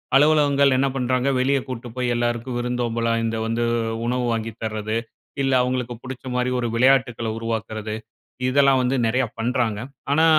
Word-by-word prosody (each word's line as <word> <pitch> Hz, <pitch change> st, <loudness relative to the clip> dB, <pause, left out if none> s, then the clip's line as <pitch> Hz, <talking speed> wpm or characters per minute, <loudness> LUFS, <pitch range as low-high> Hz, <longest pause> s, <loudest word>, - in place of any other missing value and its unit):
அலுவலகங்கள் 140 Hz, -2 st, +5 dB
என்ன 135 Hz, +1 st, +2 dB
பண்றாங்க 130 Hz, 0 st, +1 dB
வெளிய 135 Hz, +2 st, +2 dB
கூட்டு 125 Hz, -2 st, -6 dB
போயி 125 Hz, -1 st, -1 dB
எல்லாருக்கும் 120 Hz, +1 st, -1 dB
விருந்தோம்பலா 120 Hz, -1 st, -1 dB
இந்த 115 Hz, 0 st, -1 dB
வந்து 115 Hz, +1 st, 0 dB, 0.4 s
உணவு 125 Hz, 0 st, 0 dB
வாங்கி 115 Hz, 0 st, -2 dB
தர்றது, 110 Hz, 0 st, -2 dB, 0.5 s
இல்ல 135 Hz, 0 st, +2 dB
அவுங்களுக்கு 125 Hz, -1 st, -1 dB
புடிச்ச 130 Hz, 0 st, -8 dB
மாரி 125 Hz, 0 st, +1 dB
ஒரு 120 Hz, -, -1 dB
விளையாட்டுக்களை 125 Hz, -2 st, +3 dB
உருவாக்குறது. 110 Hz, -1 st, -3 dB, 0.5 s
இதெல்லாம் 135 Hz, 0 st, +4 dB
வந்து 125 Hz, +2 st, +1 dB
நெறைய 125 Hz, +3 st, +2 dB
பண்றாங்க. 115 Hz, -2 st, 0 dB, 0.3 s
ஆனா, 160 Hz, +3 st, +4 dB
125 Hz, 145 wpm, -23 LUFS, 115-130 Hz, 0.5 s, அலுவலகங்கள்